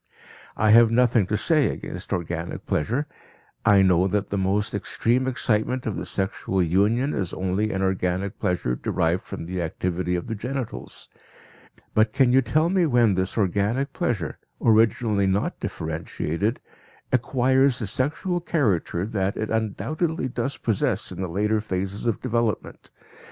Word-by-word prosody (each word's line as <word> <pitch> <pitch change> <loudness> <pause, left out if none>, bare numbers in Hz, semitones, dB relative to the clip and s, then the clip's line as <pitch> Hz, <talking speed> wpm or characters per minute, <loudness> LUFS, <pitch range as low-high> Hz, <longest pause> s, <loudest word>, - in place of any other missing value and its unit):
I 110 0 +3
have 115 0 +7
nothing 115 -3 +3
to 105 - 0
say 150 +7 +3
against - - -6
organic 85 0 -3
pleasure; 120 - 0 0.6
I 100 -2 +5
know 90 0 +4
that 100 +1 -1
the - - 0
most 100 +3 0
extreme 120 +5 0
excitement 125 0 0
of 110 - -2
the - - -5
sexual 95 -1 -1
union 105 - +2
is 95 -3 -2
only 95 +3 -1
an 95 0 -1
organic 95 +1 -1
pleasure 85 -9 0
derived 85 +8 -1
from - - -6
the 90 +1 -3
activity 90 +2 -2
of 90 - -3
the 115 - -4
genitals. 120 - -5 0.9
But 110 0 +3
can 130 -3 +3
you 135 - +6
tell 155 +6 +1
me 185 -3 +3
when 120 -6 +4
this 95 +3 -2
organic 105 +8 0
pleasure, 110 - -2 0.2
originally 110 -2 +3
not 95 +2 0
differentiated, 80 +5 -3 0.5
acquires 130 +1 +3
the 110 - -3
sexual 155 - -1
character 100 - 0
that 100 -2 -2
it 110 - -3
undoubtedly 135 - -1
does 125 +2 -3
possess 110 -4 -1
in - - -6
the 95 - -3
later 105 +4 +1
phases 95 +1 -3
of 115 - 0
development? 115 -3 -2
105 Hz, 150 wpm, -24 LUFS, 95-125 Hz, 0.9 s, have